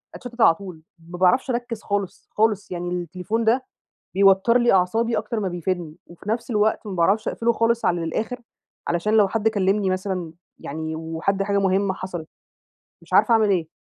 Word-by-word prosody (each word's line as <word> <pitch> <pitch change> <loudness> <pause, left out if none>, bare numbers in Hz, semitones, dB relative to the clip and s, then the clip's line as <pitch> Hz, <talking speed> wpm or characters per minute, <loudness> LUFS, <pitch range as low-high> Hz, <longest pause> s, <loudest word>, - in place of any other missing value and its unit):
أتشتت 245 -2 -7
على 165 - +6
طول. 180 -5 -10 0.3
ما 175 - -7
باعرفش 185 +9 +3
أركز 240 -2 -3
خالص، 200 -2 -3
خالص 210 -3 0
يعني 175 0 -3
التليفون 180 +5 -3
ده 250 +4 +2 0.5
بيوتّر 195 +4 +5
لي 240 -3 +3
أعصابي 225 +6 +2
أكتر 230 -3 -2
ما 200 - -1
بيفيدني. 175 -2 -3
وفي 175 +4 -11
نفس 230 +2 -2
الوقت 215 0 +1
ما 200 - -4
باعرفش 195 +6 +2
أقفله 235 0 +1
خالص 230 +1 +1
على 170 -1 +1
الآخر، 220 +9 -3 0.5
علشان 175 +6 0
لو 210 -3 +5
حد 220 +2 0
كلمني 195 -1 +1
مثلًا، 185 -3 -3 0.3
يعني 160 +2 -5
وحد 165 +5 -2
حاجة 200 0 0
مهمة 195 0 +1
حصلت. 180 -4 -6 0.8
مش - - -18
عارفة 235 - +5
أعمل 215 -2 +3
إيه؟ 175 -5 0
195 Hz, 175 wpm, -23 LUFS, 175-220 Hz, 0.8 s, على